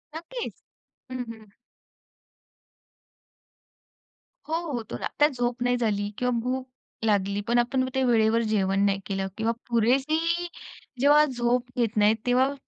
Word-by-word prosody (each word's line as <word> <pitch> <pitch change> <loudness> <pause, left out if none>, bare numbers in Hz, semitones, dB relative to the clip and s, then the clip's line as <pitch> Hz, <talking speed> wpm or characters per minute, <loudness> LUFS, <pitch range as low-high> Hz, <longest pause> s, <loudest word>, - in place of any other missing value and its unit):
नक्कीच. 445 +9 -6 0.5
हं, 255 -1 -3
हं. 220 -1 -16 3.0
हो, 320 - -1 0.2
होतो 225 - -4
ना. - - -3
तर 295 - +7
झोप 245 -1 -2
नाही 245 0 +2
झाली 205 -3 0
किंवा 250 0 0
भूक 255 +2 -2 0.4
लागली. 200 -1 +1
पण 240 +1 +3
आपण 255 +2 +1
ते 265 - +2
वेळेवर 230 -1 +3
जेवण 195 -1 +2
नाही 195 -1 +1
केलं 195 -1 -2
किंवा 225 +1 +1 0.2
पुरेशी 305 +9 +2 0.5
जेव्हा 295 +2 +6
झोप 245 -1 0
घेत 230 -2 0
नाहीत 210 +1 +5
तेव्हा 255 +3 +3
240 Hz, 130 wpm, -26 LUFS, 215-260 Hz, 3.0 s, तर